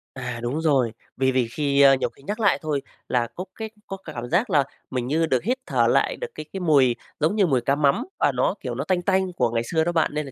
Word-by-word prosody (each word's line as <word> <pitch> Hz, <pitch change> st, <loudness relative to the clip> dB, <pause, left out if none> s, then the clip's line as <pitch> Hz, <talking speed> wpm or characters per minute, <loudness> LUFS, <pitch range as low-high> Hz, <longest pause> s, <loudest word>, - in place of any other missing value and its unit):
À, 125 Hz, -2 st, -5 dB
đúng 130 Hz, +7 st, -1 dB
rồi. 135 Hz, -7 st, +2 dB, 0.3 s
Vì 130 Hz, 0 st, +2 dB
vì 130 Hz, -2 st, +1 dB
khi 140 Hz, +3 st, +1 dB
ơ, 135 Hz, -1 st, +8 dB
nhiều 130 Hz, -, 0 dB
khi -, -, -22 dB
nhắc 210 Hz, +8 st, -4 dB
lại 205 Hz, -3 st, +3 dB
thôi 150 Hz, -4 st, -1 dB, 0.3 s
là 120 Hz, -2 st, +1 dB
có 185 Hz, -, -5 dB
cái 220 Hz, -1 st, -5 dB, 0.2 s
có 195 Hz, -, -5 dB
cả 155 Hz, -, -7 dB
cảm 120 Hz, -2 st, -6 dB
giác 190 Hz, +9 st, +2 dB
là 145 Hz, -, +4 dB, 0.3 s
mình 125 Hz, -2 st, -2 dB
như 160 Hz, +4 st, +2 dB
được 130 Hz, -6 st, 0 dB
hít 250 Hz, +5 st, 0 dB
thở -, -, +2 dB
lại -, -, +2 dB
được 485 Hz, -, -5 dB
cái -, -, -6 dB
cái 195 Hz, -, -3 dB
mùi 140 Hz, -8 st, +4 dB, 0.2 s
giống 160 Hz, +7 st, +1 dB
như 205 Hz, -3 st, +4 dB
mùi 130 Hz, -5 st, +2 dB
cá 135 Hz, +4 st, +1 dB
mắm 150 Hz, -, +2 dB
và -, -, +3 dB
nó, -, -, +1 dB
kiểu, -, -, -4 dB
nó -, -, -2 dB
tanh 185 Hz, -2 st, 0 dB
tanh 190 Hz, 0 st, +1 dB
của 170 Hz, -, +1 dB
ngày 115 Hz, 0 st, 0 dB
xưa 160 Hz, +6 st, 0 dB
đó 175 Hz, -, 0 dB
bạn, 165 Hz, -2 st, +1 dB
nên 150 Hz, 0 st, -2 dB
là 135 Hz, -, -9 dB
150 Hz, 280 wpm, -24 LUFS, 130-180 Hz, 0.3 s, ơ